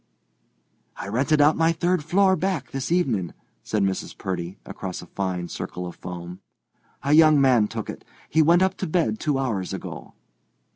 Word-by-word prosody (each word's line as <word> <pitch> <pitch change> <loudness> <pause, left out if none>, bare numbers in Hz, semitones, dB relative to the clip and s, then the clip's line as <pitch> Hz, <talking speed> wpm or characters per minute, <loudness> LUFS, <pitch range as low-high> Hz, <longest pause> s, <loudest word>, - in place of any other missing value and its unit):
"I - - -6
rented 140 +7 +2
out 150 +2 +5
my 165 0 +3
third 175 0 0
floor, 190 +4 +3
back, 185 -9 -2
this 135 +3 -4
evening," 120 - 0 0.3
said 105 -2 -1
Mrs. 95 -1 -2
Purdy, 90 0 -4
across 95 -2 -6
a - - -10
fine 90 -1 -3
circle 90 +1 -6
of 90 - -7
foam. 90 0 -8 0.6
"A 140 - +2
young 155 -1 +7
man 125 -6 +4
took 110 0 -5
it. - - -7 0.2
He 160 - +3
went 170 +4 +5
up 190 0 +2
to 190 - -3
bed 175 +6 0
two 150 -4 0
hours 110 -9 -2
ago." - - -8
135 Hz, 175 wpm, -24 LUFS, -, 0.6 s, young